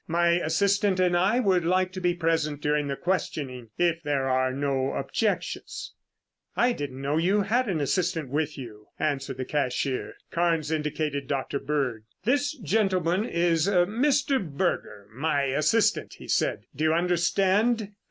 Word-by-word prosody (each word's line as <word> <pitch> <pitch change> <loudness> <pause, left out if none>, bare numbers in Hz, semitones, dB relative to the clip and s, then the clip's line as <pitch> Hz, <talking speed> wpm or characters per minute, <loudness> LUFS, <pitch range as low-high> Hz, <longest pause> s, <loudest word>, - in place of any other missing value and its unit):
"My 170 +1 +2
assistant 190 +4 +2
and 180 -1 +3
I 195 +7 +3
would 190 -7 +2
like 185 +2 +1
to 185 0 -6
be 175 -1 +1
present 160 -3 0
during 150 0 0
the 140 - -2
questioning, 135 -9 -3
if 170 -1 +1
there 145 -4 -1
are 130 0 +2
no 135 0 -1
objections." 215 - -2 0.6
"I 245 +1 +3
didn't 135 - -6
know 145 +2 0
that - - +2
you 195 +4 +3
had 235 +4 +1
an 170 -5 0
assistant 165 0 0
with 150 +2 -1
you," 110 -5 -10
answered 135 -3 -2
the 130 - -3
cashier. 135 -2 -1 0.2
Carnes 165 -3 +1
indicated 150 -2 -2
Dr. 140 0 -2
Bird. 135 -7 -2 0.2
"This 285 +5 +1
gentleman 190 - +1
is 170 -3 +1
Mr. 240 +8 +2
Berger, 140 - -2
my 145 +2 0
assistant," 150 +11 +1
he - - -12
said. - - 0
"Do 155 - -2
you 155 - +3
understand?" 195 +6 +2
165 Hz, 150 wpm, -26 LUFS, 140-190 Hz, 0.6 s, and